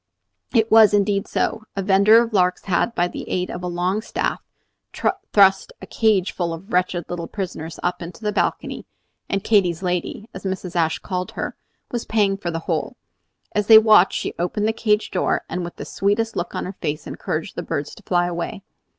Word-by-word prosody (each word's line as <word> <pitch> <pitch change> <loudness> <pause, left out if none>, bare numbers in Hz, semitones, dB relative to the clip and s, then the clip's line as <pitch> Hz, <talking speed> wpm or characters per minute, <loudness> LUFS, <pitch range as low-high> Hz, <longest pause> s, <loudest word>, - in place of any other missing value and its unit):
It 225 -2 +2
was 220 -2 +7
indeed 200 -1 +1
so. 220 -1 -1
A 195 - -2
vender 200 +4 +6
of 230 -1 -7
larks 180 -2 +2
had, 195 +5 0
by 175 - +2
the - - -8
aid 180 0 -1
of 180 - -6
a 180 - -3
long 180 +4 -1
staff, - - -2 0.9
thrust 195 -2 +4
a - - -9
cage 210 -3 +1
full 170 -2 -2
of 190 +7 -12
wretched 180 -2 +1
little 170 -1 -5
prisoners 170 -5 -6
up 175 +1 -1
into 175 +6 -9
the 210 - 0
balcony; 210 - -2 0.4
and 195 -1 -1
"Katy's 190 -5 +2
lady," 180 +4 -2
as 185 - -9
Mrs. 190 -2 -4
Ashe 160 -2 +1
called 180 -2 -4
her, - - -4 0.4
was 240 -1 -3
paying 205 -3 +2
for 185 -3 -4
the 165 - -2
whole. 170 - -2 0.6
As 210 -1 -1
they 220 - +10
watched 215 -4 +6
she - - -4
opened 195 +5 0
the 220 - +1
cage 210 -1 0
door, - - 0
and 180 - -3
with 175 - -7
the - - -7
sweetest 215 +3 0
look 175 - -3
on - - -2
her 185 - -5
face 150 -2 -3
encouraged - - -4
the - - -3
birds 145 0 -4
to - - -13
fly 175 -3 +1
away. 175 +2 -4
190 Hz, 200 wpm, -22 LUFS, 175-210 Hz, 0.9 s, they